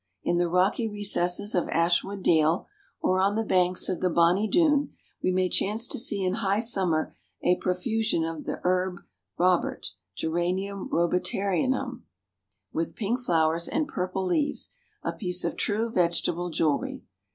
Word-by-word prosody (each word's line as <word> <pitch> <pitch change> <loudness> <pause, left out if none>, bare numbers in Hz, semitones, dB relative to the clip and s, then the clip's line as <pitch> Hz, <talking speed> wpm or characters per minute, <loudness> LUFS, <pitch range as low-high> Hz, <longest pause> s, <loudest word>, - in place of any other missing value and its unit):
In 175 - +1
the 175 0 +1
rocky 185 +6 +2
recesses 205 -2 0
of 180 - 0
Ashwood 175 +4 +1
Dale, 160 +1 +3 0.4
or 185 0 +2
on 195 +2 +2
the 225 0 0
banks 180 -2 +2
of 185 - -2
the 185 - +2
'bonny 175 +5 +3
Doon,' 295 0 +2 0.3
we 185 - +1
may 185 0 +2
chance 215 +6 +1
to - - 0
see 225 -6 +2
in 185 - +1
high 200 0 +1
summer 190 -9 +1 0.3
a 180 - +3
profusion 190 0 0
of 165 -1 -5
the - - -4
Herb 180 0 0 0.4
Robert, 180 - +1 0.2
Geranium 185 +4 -2
Robertianum, 200 +9 0 0.7
with 165 +1 -2
pink 230 +3 -1
flowers 165 -6 +1
and 310 -1 -1
purple 185 -2 -3
leaves, 285 +11 0 0.3
a - - -2
piece 180 -3 -1
of - - -2
true 220 +2 -1
vegetable 175 -1 0
jewelry. 155 -2 -1
185 Hz, 150 wpm, -27 LUFS, 175-210 Hz, 0.7 s, Dale